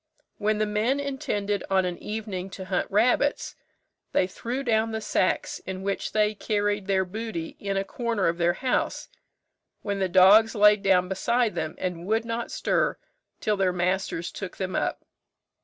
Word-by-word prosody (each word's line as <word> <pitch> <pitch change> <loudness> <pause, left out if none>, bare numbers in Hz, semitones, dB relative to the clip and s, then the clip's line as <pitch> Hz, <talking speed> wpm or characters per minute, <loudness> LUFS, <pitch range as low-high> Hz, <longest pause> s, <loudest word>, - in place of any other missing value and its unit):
When 215 +1 +1
the 215 - +1
men 215 +6 0
intended 210 -8 -2
on 190 -1 +3
an 180 -1 -3
evening 210 -4 -5
to 190 - -7
hunt 185 -1 -1
rabbits, 245 +7 +2 0.6
they - - +3
threw 240 +8 -4
down 225 -2 +1
the 220 - -1
sacks 295 +8 0
in 190 0 -6
which 200 0 -2
they 215 0 +2
carried 205 -1 -1
their 190 -1 +2
booty 205 -4 -5
in 200 -1 -2
a 195 - +1
corner 230 -1 -1
of 170 +1 -1
their 175 0 +3
house, 255 +6 -1 0.7
when 200 -1 -2
the 190 -1 0
dogs 200 +5 +6
lay 210 0 +7
down 190 -2 +3
beside 235 +4 +1
them, 160 -2 -3
and 180 -1 -4
would 225 +2 +1
not 230 +1 -3
stir - - 0 0.4
till 210 -1 0
their 190 -1 +2
masters 180 -1 -1
took 195 -3 -7
them 185 -1 -3
up. - - -2
205 Hz, 170 wpm, -26 LUFS, 185-220 Hz, 0.7 s, lay